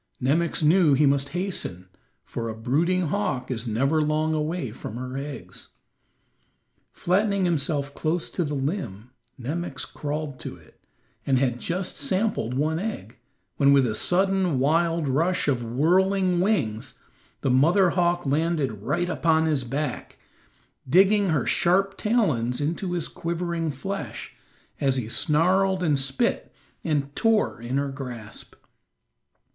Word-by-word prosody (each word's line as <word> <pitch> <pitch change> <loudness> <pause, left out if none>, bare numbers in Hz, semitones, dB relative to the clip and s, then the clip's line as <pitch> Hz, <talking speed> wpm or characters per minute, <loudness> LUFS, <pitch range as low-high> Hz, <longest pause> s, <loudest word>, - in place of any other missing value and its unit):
Nemox 155 +6 +1
knew 155 -2 +5
he 150 +2 +4
must 140 0 +2
hasten, 170 - -3 0.4
for 115 -1 -4
a 110 - -5
brooding 160 +9 +1
hawk 125 +4 -2
is 120 -1 -3
never 135 +8 +1
long 155 +1 +1
away 155 -4 -2
from 110 -1 -8
her 130 +1 -5
eggs. 140 +1 -7 1.2
Flattening 200 +1 +1
himself 145 -4 -1
close 165 +3 -1
to 180 - -1
the 150 -2 -3
limb 135 - -4 0.3
Nemox 145 +2 -3
crawled 150 -2 -5
to - - -6
it, - - -21 0.4
and 135 -1 +2
had 125 -2 0
just 180 +6 -3
sampled 160 - -1
one 155 +4 0
egg, 215 +3 -5 0.4
when 140 -1 +5
with 140 -2 +5
a 110 - -1
sudden, 185 - +1
wild 165 +3 +2
rush 165 +7 +1
of 130 -4 +1
whirling 180 +9 +2
wings, 130 - -1 0.4
the 135 - +1
mother 170 +8 +4
hawk 175 -1 +1
landed 145 -6 0
right 155 +10 -1
upon 160 -2 +2
his 150 -5 +1
back, 140 +5 -4 0.7
digging 195 +5 +5
her 150 -6 +1
sharp 195 +3 +2
talons 155 - +1
into 170 +5 -2
his 175 -3 -1
quivering 170 -1 -3
flesh, 195 +8 -5 0.5
as 135 -2 +2
he 125 -4 -2
snarled 180 - +2
and 150 -5 +2
spit 135 0 -1 0.3
and 145 -3 -1
tore 225 - +1
in 120 +3 -2
her 140 0 0
grasp. 125 -6 -8
155 Hz, 135 wpm, -25 LUFS, 135-175 Hz, 1.2 s, knew